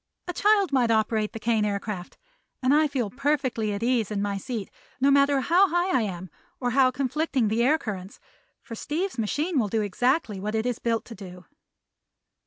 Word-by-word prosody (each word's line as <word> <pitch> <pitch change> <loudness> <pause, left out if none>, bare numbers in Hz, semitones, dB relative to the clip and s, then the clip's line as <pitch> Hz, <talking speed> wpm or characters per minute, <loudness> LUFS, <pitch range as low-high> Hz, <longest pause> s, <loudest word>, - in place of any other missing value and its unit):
A 355 - -3
child 405 -3 +3
might 250 -3 +3
operate 220 -1 +1
the 225 - -7
Kane 225 -1 +1
Aircraft, 200 -2 -4 0.5
and 255 +2 +4
I 305 +1 +4
feel 255 -8 -2
perfectly 260 -5 -1
at 200 +2 -3
ease 240 -3 +1
in 210 -2 -2
my 200 0 -1
seat, 205 +1 -5 0.3
no 275 +2 +4
matter 280 0 +4
how 365 +7 +4
high 350 +2 +1
I 255 - +3
am 185 -4 -5 0.3
or 245 -2 -1
how 260 +1 +4
conflicting 265 -2 -1
the 225 +2 +1
air 295 +6 +4
currents; 195 -8 -7 0.4
for 235 - -9
Steve's 310 - -3
machine 295 - 0
will 220 - +1
do 220 +1 0
exactly 225 - 0
what 210 +3 -3
it 220 +1 0
is 245 -2 -1
built 230 -1 -1
to 235 - -10
do." 180 -3 -11
235 Hz, 190 wpm, -26 LUFS, 210-280 Hz, 0.5 s, and